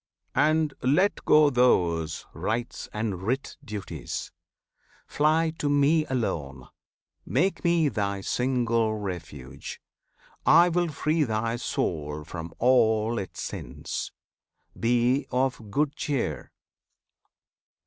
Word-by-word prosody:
And 155 Hz, -1 st, +2 dB
let 165 Hz, +11 st, +2 dB
go 150 Hz, -1 st, +6 dB
those 85 Hz, -, +2 dB
Rites 115 Hz, +3 st, -3 dB
and 105 Hz, -4 st, -3 dB
writ 125 Hz, +8 st, -2 dB
duties! 105 Hz, -3 st, -6 dB, 0.7 s
Fly 160 Hz, +2 st, +2 dB
to 145 Hz, -, 0 dB
Me 145 Hz, +2 st, +3 dB
alone! 70 Hz, -, -3 dB, 0.5 s
Make 160 Hz, -, 0 dB
Me 170 Hz, -3 st, +3 dB
thy 100 Hz, -6 st, -1 dB
single 115 Hz, -2 st, +1 dB
refuge! 85 Hz, -10 st, -7 dB, 0.6 s
I 175 Hz, +1 st, +6 dB
will 175 Hz, 0 st, +1 dB
free 155 Hz, +1 st, 0 dB
Thy 115 Hz, -1 st, -1 dB
soul 75 Hz, -9 st, -2 dB
from 80 Hz, +1 st, -7 dB
all 115 Hz, -2 st, +3 dB
its 95 Hz, -, -6 dB
sins! 70 Hz, +5 st, -5 dB, 0.6 s
Be 120 Hz, +4 st, +2 dB
of 125 Hz, -4 st, -1 dB
good 145 Hz, +5 st, 0 dB
cheer! 115 Hz, -, -2 dB
120 Hz, 100 wpm, -27 LUFS, 95-145 Hz, 0.7 s, go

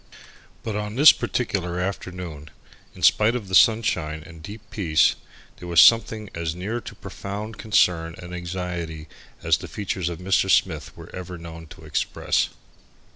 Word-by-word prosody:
But 110 Hz, -2 st, -3 dB
on 105 Hz, 0 st, -4 dB
this 145 Hz, +4 st, +9 dB
particular 90 Hz, -7 st, -2 dB
afternoon, 90 Hz, -5 st, -5 dB, 0.5 s
in -, -, -10 dB
spite 110 Hz, +3 st, +5 dB
of 110 Hz, -5 st, -4 dB
the -, -, -8 dB
sunshine 95 Hz, -9 st, +3 dB
and 85 Hz, -2 st, -13 dB
deep 105 Hz, +6 st, -9 dB
peace, 80 Hz, -7 st, +3 dB, 0.4 s
there 90 Hz, -, -9 dB
was 85 Hz, -2 st, +3 dB
something 115 Hz, -2 st, +5 dB
as 85 Hz, -1 st, -3 dB
near 105 Hz, +7 st, -4 dB
to -, -, -10 dB
profound 105 Hz, +2 st, -7 dB
concern 85 Hz, -6 st, +2 dB
and 90 Hz, -1 st, -9 dB
anxiety 85 Hz, -3 st, -5 dB, 0.4 s
as -, -, +3 dB
the -, -, -8 dB
features 95 Hz, -4 st, -3 dB
of 85 Hz, -, -5 dB
Mr. 95 Hz, +2 st, +1 dB
Smith 85 Hz, -7 st, +1 dB
were -, -, -11 dB
ever 90 Hz, -1 st, -7 dB
known 80 Hz, -1 st, -10 dB
to -, -, -14 dB
express. -, -, 0 dB
90 Hz, 155 wpm, -24 LUFS, 85-105 Hz, 0.5 s, this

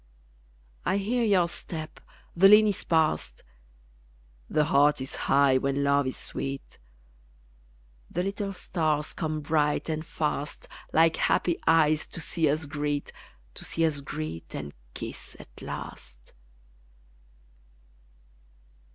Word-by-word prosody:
I -, -, +1 dB
hear 235 Hz, +5 st, 0 dB
your 195 Hz, -6 st, +4 dB
step; 160 Hz, -2 st, -6 dB, 0.4 s
the 190 Hz, +3 st, +7 dB
lane 210 Hz, +2 st, +8 dB
is 205 Hz, -3 st, 0 dB
passed; 160 Hz, -2 st, +1 dB, 1.1 s
The 150 Hz, -, +2 dB
heart 145 Hz, 0 st, +4 dB
is 130 Hz, +1 st, -5 dB
high 135 Hz, -1 st, +3 dB
when 140 Hz, +1 st, 0 dB
LOVE 140 Hz, -1 st, +3 dB
is 130 Hz, -, -4 dB
sweet 135 Hz, 0 st, -6 dB, 1.3 s
The 180 Hz, -, -1 dB
little 195 Hz, +1 st, -2 dB
stars 155 Hz, -4 st, -1 dB
come 155 Hz, -1 st, -2 dB
bright 150 Hz, +1 st, +1 dB
and 155 Hz, 0 st, -2 dB
fast, 150 Hz, -2 st, -3 dB, 0.2 s
Like 165 Hz, 0 st, +4 dB
happy 175 Hz, -2 st, +1 dB
eyes 155 Hz, -1 st, +4 dB
to -, -, -7 dB
see 160 Hz, -1 st, 0 dB
us 155 Hz, +1 st, 0 dB
greet, 145 Hz, 0 st, -2 dB, 0.4 s
To -, -, -8 dB
see 165 Hz, -, 0 dB
us 150 Hz, -3 st, -1 dB
greet 80 Hz, -, -6 dB
and 75 Hz, 0 st, -6 dB, 0.2 s
kiss -, -, -7 dB
at -, -, -14 dB
last. -, -, -8 dB
155 Hz, 120 wpm, -27 LUFS, 140-165 Hz, 1.3 s, lane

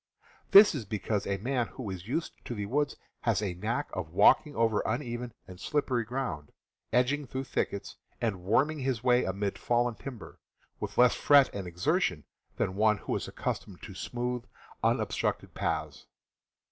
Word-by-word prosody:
This 205 Hz, +1 st, +9 dB
is 140 Hz, -7 st, -3 dB
because 105 Hz, 0 st, -2 dB
a 100 Hz, -, 0 dB
man 120 Hz, +3 st, -1 dB
who 115 Hz, -7 st, -6 dB
is 95 Hz, 0 st, -7 dB
used 160 Hz, +7 st, -2 dB
to 120 Hz, -, -4 dB
the 105 Hz, -1 st, -3 dB
woods 145 Hz, +7 st, 0 dB, 0.2 s
has -, -, +1 dB
a 100 Hz, -4 st, -2 dB
knack 115 Hz, +10 st, -2 dB
of 90 Hz, -4 st, -4 dB
walking 145 Hz, -, +4 dB
over 115 Hz, -2 st, +2 dB
uneven 120 Hz, 0 st, -3 dB, 0.2 s
and 90 Hz, -1 st, -11 dB
slippery 135 Hz, -4 st, 0 dB
ground, 115 Hz, -, -4 dB, 0.4 s
edging 130 Hz, +4 st, +2 dB
through 130 Hz, +1 st, -3 dB
thickets, 100 Hz, -6 st, -3 dB, 0.2 s
and 110 Hz, -6 st, -1 dB
worming 140 Hz, -, +2 dB
his 130 Hz, -4 st, -1 dB
way 125 Hz, 0 st, +4 dB
amid 100 Hz, +2 st, -2 dB
fallen 120 Hz, 0 st, +1 dB
timber, 120 Hz, -1 st, -9 dB, 0.4 s
with -, -, -5 dB
less 125 Hz, 0 st, +6 dB
fret 140 Hz, -2 st, +5 dB
and 100 Hz, -3 st, -5 dB
exertion 90 Hz, -, 0 dB, 0.3 s
than 95 Hz, -, 0 dB
one 105 Hz, +1 st, +3 dB
who -, -, -3 dB
is -, -, -3 dB
accustomed -, -, -5 dB
to -, -, -8 dB
smooth, 125 Hz, 0 st, -3 dB, 0.4 s
unobstructed -, -, 0 dB
paths. -, -, -3 dB
120 Hz, 160 wpm, -30 LUFS, 100-130 Hz, 0.4 s, This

